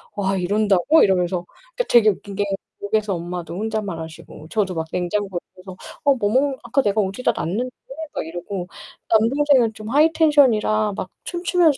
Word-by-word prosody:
와. 195 -1 0
이런다고?" 205 - +3
이러면서 180 -2 +1 0.3
그러니까 - - 0
되게 225 -3 +6
웃긴 200 0 -4
게 205 0 0 0.4
집에서 205 -1 0
엄마도 175 0 -5
혼잣말하시고 175 -8 -5
저도 195 -5 -1
막 160 0 -3
냉장고 180 +1 -1 0.2
옆에서 185 0 -10 0.2
"아, - - -32
뭐 280 -1 +5
먹는 260 +6 +1
아까 240 +4 +1
내가 210 -1 +1
어디다 200 +5 0
놨는데." 225 +10 -2 0.4
막 - - -3
이러고 175 +2 -5 0.4
남동생은 240 +1 +3
좀 215 0 -8
하이 305 +5 +4
텐션이라 235 -9 +3
막 185 - -3 0.2
춤추면서 345 -4 +2
210 Hz, 370 characters per minute, -21 LUFS, 185-250 Hz, 0.4 s, 되게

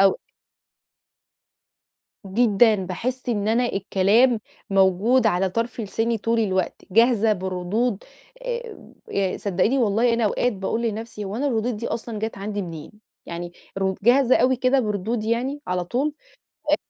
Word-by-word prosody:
أو 195 -1 +4 2.1
جدًا، 220 +2 +4
باحس 225 +8 -4
إن 210 -3 0
أنا 240 +3 +2
الكلام 215 +4 +2 0.3
موجود 195 +6 +3
على 190 -2 +2
طرف 230 +3 -2
لساني 225 +2 -1
طول 230 +2 0
الوقت، 190 -4 -1
جاهزة 225 0 +4
بردود، 190 +4 -2 0.4
آآ 475 - -4
صدقيني 200 +7 +1
والله 230 +1 +2
أنا 230 -1 +1
أوقات 245 +3 +1
باقول 195 +4 -2
لنفسي 225 -1 -4
هو 200 +3 -5
أنا 285 +3 -1
الردود 235 -2 0
دي 230 +3 -4
أصلًا 225 -2 -4
جات 220 -1 -4
عندي 205 0 -3
منين؟ 165 -4 -8 0.3
يعني 175 0 -6 0.3
ردو 190 0 0
جاهزة 255 +2 +5
أوي 255 0 +3
كده، 255 +2 +2
بردود 215 +1 -2
يعني 250 +6 -1
على 180 -1 -1
طول؟ 270 - -1 0.6
أ - - +6
220 Hz, 140 wpm, -23 LUFS, 195-240 Hz, 2.1 s, أ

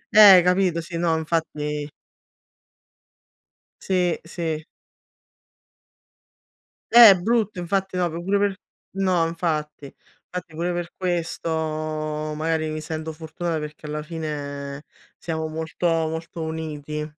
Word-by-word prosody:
Eh, 195 -4 +10
capito, 180 -2 +2
sì, 170 +1 -7
no, 165 -1 +1
infatti 150 -2 -2 1.9
Sì, 180 -2 +1
sì. 165 -2 -4 2.3
Eh, 235 -2 +11
è - - +5
brutto, 215 -1 0
infatti 190 +1 -1
no 175 -1 +1
pure 175 +5 -1
per 200 -1 +1 0.4
no, 185 -4 +2
infatti, 155 -3 -2
infatti 175 +4 -10
pure 170 +3 -1
per 175 -1 -4
questo 175 -2 -2 0.9
magari 155 0 -1
mi 155 0 -4
sento 160 0 -5
fortunata 160 +1 -4
perché 150 0 -8
alla 150 0 -4
fine 145 -3 -5 0.3
siamo 160 -1 -3
molto 160 +2 -3
molto 165 0 -1
uniti. 150 -1 -4
165 Hz, 110 wpm, -24 LUFS, 155-180 Hz, 2.3 s, Eh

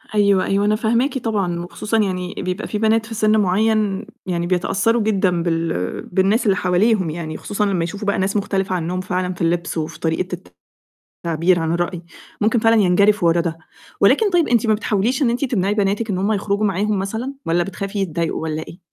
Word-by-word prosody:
أيوه، 200 -2 +3
أيوه، 200 +1 +1
أنا 210 0 +3
فاهماكِ 235 +6 +1
طبعًا، 200 -7 -1
وخصوصًا 210 +5 -3
يعني 185 -3 -1
بيبقى 185 +3 -3
في 210 - -3
بنات 220 +1 +2
في 225 - -8
سِن 215 0 +2
معيّن 210 +1 +1 0.2
يعني 175 -2 -2
بيتأثّروا 195 +5 +1
جدًا 190 -5 +1
بال 165 - -2
بالناس 195 +6 +1
اللي 195 -2 +3
حواليهم 185 0 +2
يعني، 160 0 -5
وخصوصًا 210 0 -2
لمّا 185 -4 0
يشوفوا 205 +4 -5
بقى 200 - +1
ناس 195 +2 0
مختلفة 195 -2 -1
عنّهم 180 +2 -2
فعلًا 180 0 -2
في 170 - -11
اللبس 170 0 0
وفي 155 0 -4
طريقة 175 +2 -1 0.9
التعبير 170 +2 +2
عن 160 0 -1
الرأي، 175 0 -2 0.4
ممكن 225 +2 +3
فعلًا 225 +1 +4
ينجرفوا 200 0 +3
ورا 170 +1 +3
ده، 165 -1 -3 0.4
ولكن 435 -2 +4
طيب 345 -4 +2
أنتِ 235 -1 +2
ما 215 - +4
بتحاوليش 220 +6 0
إن 245 - +3
أنتِ 245 +4 0
تمنعي 205 -5 0
بناتِك 210 +2 0
إن 185 - -1
هم 200 +4 0
يخرجوا 205 +1 0
معاهم 200 +1 0
مثلًا، 225 +8 -3
والّا 175 +1 +1
بتخافي 195 +1 -5
يتضايقوا 170 -4 -2
والّا 160 0 -3
إيه؟ 175 - -11
195 Hz, 190 wpm, -20 LUFS, 175-215 Hz, 0.9 s, فعلًا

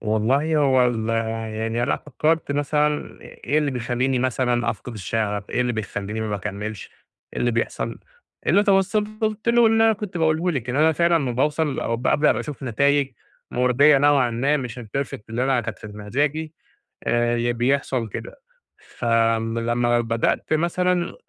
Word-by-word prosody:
والله 125 +9 +1
هو 130 -4 +4
ال 115 -2 -2 0.5
يعني 115 +2 -1
لأ - - 0
فكّرت 155 +2 -1
مثلًا 150 +1 0
إ - - -14
إيه 150 - -2
اللي 150 -2 0
بيخلّيني 125 +1 -1
مثلًا 120 -1 0
أفقِد 120 +2 -7
الشغف 105 0 -3
إيه - - 0
اللي 125 -1 +1
بيخلّيني 105 0 -4
ما 110 - -2
باكملش 105 +1 -5 0.4
إيه - - -5
اللي 120 - +2
بيحصَل 115 0 -2 0.5
اللي 205 - +4
توصَّلت 215 +2 0
له 235 0 +5
اللي 225 0 +4
أنا 225 - +5
كنت 205 -3 -6
باقوله 160 +2 +1
لِك 130 -6 -3
إن 125 - -2
أنا 160 +2 +4
فعلًا 170 +2 +2
لما 140 -7 +1
باوصل 150 +3 0
أو 115 - -1
بأبدأ 145 +5 +2
أشوف 150 -2 -7
نتايج 140 +3 +1 0.4
مرضّية 125 +4 +4
نوعًا 140 -3 +3
ما 135 +6 +1
مش 125 -3 -5
الperfect 125 +3 -4
اللي 120 +3 -1
أنا 135 -2 +2
كانت 115 -4 -6
في - - -10
د 105 - -10
مزاجي، 145 +9 -2 0.5
آآ 120 0 +1
ي 120 0 0
بيحصَل 125 -1 0
كده. 105 - -8 0.4
ف - - -11
آمم 115 0 +2
لما 120 +1 +1
بدأت 115 +5 -1
مثلًا 175 +2 +1
130 Hz, 165 wpm, -23 LUFS, 115-150 Hz, 0.5 s, له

